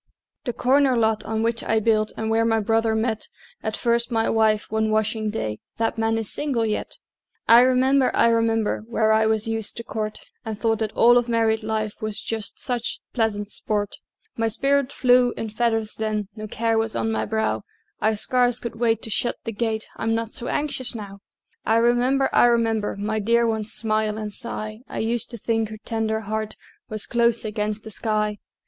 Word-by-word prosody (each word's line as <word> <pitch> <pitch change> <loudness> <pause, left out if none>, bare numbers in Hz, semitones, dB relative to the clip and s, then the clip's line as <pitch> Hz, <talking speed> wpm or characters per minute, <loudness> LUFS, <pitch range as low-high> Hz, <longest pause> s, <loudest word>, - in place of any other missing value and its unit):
The 245 - -2
"corner 260 +2 +3
lot" 220 -2 +1
on 220 0 -1
which 230 0 0
I 220 - +2
built, 215 -1 +2
And 220 0 -2
where 225 0 +3
my 225 -1 +2
brother 225 +1 +1
met 220 -1 -1 0.3
At 220 0 -3
first 235 0 +1
my 225 -1 +1
wife, 220 -2 +2
one 220 0 +1
washing 215 0 0
day, 110 - -3 0.2
That 225 0 -1
man 225 0 +1
is 225 -2 -4
single 270 -6 -1
yet! 215 -1 -3 0.5
I 230 +1 +9
remember, 260 +1 +4
I 235 - +5
remember, 225 -2 +1
Where 220 -2 +2
I 220 0 +4
was 220 0 +1
used 225 -2 -3
to 230 - -4
court, 215 -2 -4 0.2
And 220 -3 -5
thought 225 +1 0
that 220 -1 -1
all 240 +1 +6
of 240 0 -4
married 225 -1 +2
life 215 -1 -3
Was 215 -1 -3
just 220 -2 -5
such 245 -3 -2
pleasant 210 -3 0
sport: 205 -2 -2 0.4
My 225 0 0
spirit 275 +4 +1
flew 250 -2 +3
in 225 - -3
feathers 225 0 0
then, 215 -2 -2
No 215 -1 -6
care 225 +1 0
was 225 0 -1
on 225 - 0
my 220 - -1
brow; 220 - -1 0.4
I 220 0 +2
scarce 245 +2 +2
could 235 -2 -6
wait 225 -2 +1
to 225 - -3
shut 240 - +1
the 225 - -3
gate, 220 0 -2
I'm 225 0 0
not 225 0 -3
so 240 - -3
anxious 280 -5 -1
now! 200 -2 -8 0.4
I 220 - +2
remember, 245 +3 +3
I - - +6
remember, 225 -3 +1
My 215 +2 -1
dear 235 +3 +3
one's 220 -1 -1
smile 215 -1 0
and 210 -1 -5
sigh; 215 -3 -5
I - - -6
used 230 +1 -1
to 235 - -7
think 225 0 -1
her 215 - -7
tender 220 -1 -1
heart 215 0 -3 0.3
Was 215 -1 -1
close 235 -1 +2
against 210 0 -2
the 220 - -9
sky. 210 -1 -1
225 Hz, 195 wpm, -23 LUFS, 215-235 Hz, 0.5 s, I